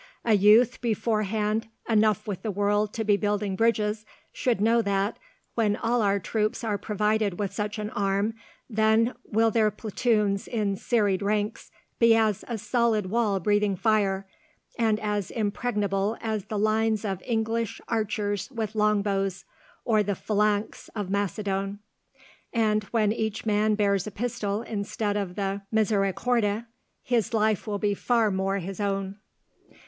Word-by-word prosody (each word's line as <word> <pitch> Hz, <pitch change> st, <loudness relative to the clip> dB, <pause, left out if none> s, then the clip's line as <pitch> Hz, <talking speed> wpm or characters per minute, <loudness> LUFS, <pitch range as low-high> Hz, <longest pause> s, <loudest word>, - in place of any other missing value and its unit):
A 230 Hz, -, +4 dB
youth 215 Hz, +5 st, +5 dB
beforehand 220 Hz, -1 st, 0 dB, 0.2 s
enough 215 Hz, -2 st, +2 dB
with 200 Hz, -4 st, -4 dB
the 220 Hz, -, -3 dB
world 205 Hz, +1 st, +1 dB
to 225 Hz, -, -1 dB
be 205 Hz, -1 st, +3 dB
building 205 Hz, -1 st, -1 dB
bridges 215 Hz, 0 st, +1 dB, 0.3 s
should 245 Hz, -5 st, 0 dB
know 230 Hz, +3 st, +4 dB
that, 200 Hz, 0 st, -1 dB, 0.3 s
when 215 Hz, -3 st, +1 dB
all 235 Hz, +2 st, 0 dB
our 200 Hz, -1 st, +2 dB
troops 215 Hz, +5 st, -1 dB
are 210 Hz, -3 st, -1 dB
provided 210 Hz, -2 st, 0 dB
with 200 Hz, -2 st, -2 dB
such 210 Hz, +2 st, -3 dB
an 210 Hz, 0 st, -4 dB
arm, 200 Hz, +2 st, 0 dB, 0.3 s
then 220 Hz, +1 st, +2 dB
will 225 Hz, +1 st, +2 dB
their 215 Hz, -1 st, +3 dB
platoons 210 Hz, -1 st, 0 dB
in 210 Hz, -4 st, -1 dB
serried 205 Hz, -3 st, +1 dB
ranks 210 Hz, +1 st, -1 dB, 0.3 s
be 230 Hz, -1 st, +6 dB
as 220 Hz, -3 st, +1 dB
a 235 Hz, -, -3 dB
solid 215 Hz, -2 st, 0 dB
wall 215 Hz, -4 st, +1 dB
breathing 205 Hz, +1 st, +2 dB
fire, 195 Hz, -2 st, +1 dB, 0.5 s
and 220 Hz, -2 st, +1 dB
as 210 Hz, -3 st, -2 dB
impregnable 210 Hz, -2 st, -1 dB
as 215 Hz, -3 st, -3 dB
the 215 Hz, 0 st, -4 dB
lines 215 Hz, +1 st, +1 dB
of 190 Hz, -3 st, -3 dB
English 225 Hz, -1 st, -1 dB
archers 210 Hz, -2 st, -1 dB
with 225 Hz, -5 st, -4 dB
long 210 Hz, -1 st, +2 dB
bows, 195 Hz, -2 st, -1 dB, 0.4 s
or 220 Hz, -3 st, +3 dB
the 200 Hz, -1 st, -1 dB
phalanx 210 Hz, +1 st, -1 dB
of 205 Hz, -3 st, -3 dB
Macedon. 200 Hz, 0 st, -1 dB, 0.7 s
And, 215 Hz, -2 st, +1 dB
when 215 Hz, -1 st, +1 dB
each 220 Hz, -1 st, -2 dB
man 215 Hz, 0 st, +2 dB
bears 200 Hz, -2 st, +1 dB
a -, -, -5 dB
pistol 210 Hz, -1 st, -2 dB
instead 205 Hz, -1 st, -2 dB
of 195 Hz, -3 st, -3 dB
the 195 Hz, 0 st, -2 dB
misericorde, 215 Hz, +1 st, +1 dB, 0.4 s
his 235 Hz, -1 st, 0 dB
life 215 Hz, -1 st, +1 dB
will 205 Hz, -1 st, -1 dB
be 205 Hz, 0 st, +1 dB
far 225 Hz, +1 st, +1 dB
more 195 Hz, +1 st, 0 dB
his 195 Hz, +1 st, -6 dB
own." 195 Hz, 0 st, -2 dB
210 Hz, 150 wpm, -26 LUFS, 200-220 Hz, 0.7 s, be